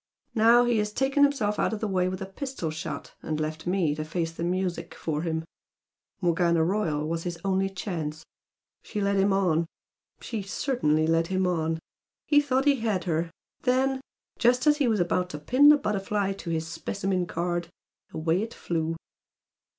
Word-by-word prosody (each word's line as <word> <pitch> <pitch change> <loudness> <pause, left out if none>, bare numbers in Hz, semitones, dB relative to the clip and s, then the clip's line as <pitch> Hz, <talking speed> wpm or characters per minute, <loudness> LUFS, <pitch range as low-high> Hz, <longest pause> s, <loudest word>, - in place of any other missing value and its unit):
Now 235 +2 +6
he 240 -2 +2
has 210 0 -1
taken 270 +5 +1
himself 270 -8 +2
out - - +1
of 215 - -3
the 220 - -1
way 185 -2 +1
with 185 +1 -4
a - - -4
pistol 195 - -4
shot, 155 +1 -6
and 155 -1 -3
left 155 +2 -4
me 180 -5 +2
to 155 +1 -3
face 165 +1 -2
the 165 - -6
music 175 -1 -2
for 150 -2 -2
him. 160 -1 -2 0.8
Morgana 170 -1 +3
Royal 160 -5 0
was 165 +1 -2
his 175 0 -4
only 195 0 +1
chance. 160 -5 -4 0.6
She 210 - -5
led 200 0 +1
him 195 +1 +3
on, 175 -4 +2 0.5
she 225 -3 -4
certainly 190 - 0
led 165 +1 +2
him 190 0 0
on. 165 -2 0 0.5
He 290 -1 +5
thought 270 -1 +1
he 285 -1 +4
had 215 -6 -1
her, 165 -1 -1 0.3
then 265 +1 +1 0.4
just 245 +2 +3
as 295 -1 +5
he 285 -4 +2
was 220 -3 +2
about 180 +1 +1
to 150 - -5
pin 255 - +5
the 300 - +8
butterfly 205 -4 -1
to 190 -3 -8
his 160 -1 -1
specimen 185 +2 -2
card, 175 0 -2 0.4
away 165 +3 0
it 225 +1 -5
flew!" 165 -1 -2
185 Hz, 180 wpm, -27 LUFS, 165-220 Hz, 0.8 s, the